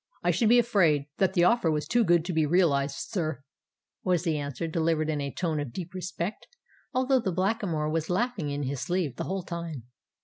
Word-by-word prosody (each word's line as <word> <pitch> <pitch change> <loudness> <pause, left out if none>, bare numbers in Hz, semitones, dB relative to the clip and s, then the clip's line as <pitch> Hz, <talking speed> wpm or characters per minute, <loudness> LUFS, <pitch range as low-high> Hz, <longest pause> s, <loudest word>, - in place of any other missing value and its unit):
"I - - +3
should 225 -3 +2
be 240 - +7
afraid 185 -12 +3
that 190 -1 +2
the 175 - +3
offer 205 -2 +4
was 150 -1 -1
too 240 -1 +3
good 170 -4 +3
to 180 - -2
be 155 -1 +2
realized, 145 -5 +2
sir," 155 - -2 0.6
was 180 -2 +1
the 165 -3 0
answer, 145 +1 -3
delivered 160 -1 0
in 150 -2 -2
a 140 0 -3
tone 160 -2 -1
of 145 -4 -4
deep 175 +5 -6
respect; 185 +1 -4 0.4
although 260 +1 +2
the 195 -5 -1
Blackamoor 185 -4 0
was 160 0 -1
laughing 190 -4 0
in 145 0 -2
his 135 0 -3
sleeve 165 -3 -1
the - - -3
whole 190 0 -3
time. 170 -7 -5
170 Hz, 205 wpm, -28 LUFS, 150-190 Hz, 0.6 s, be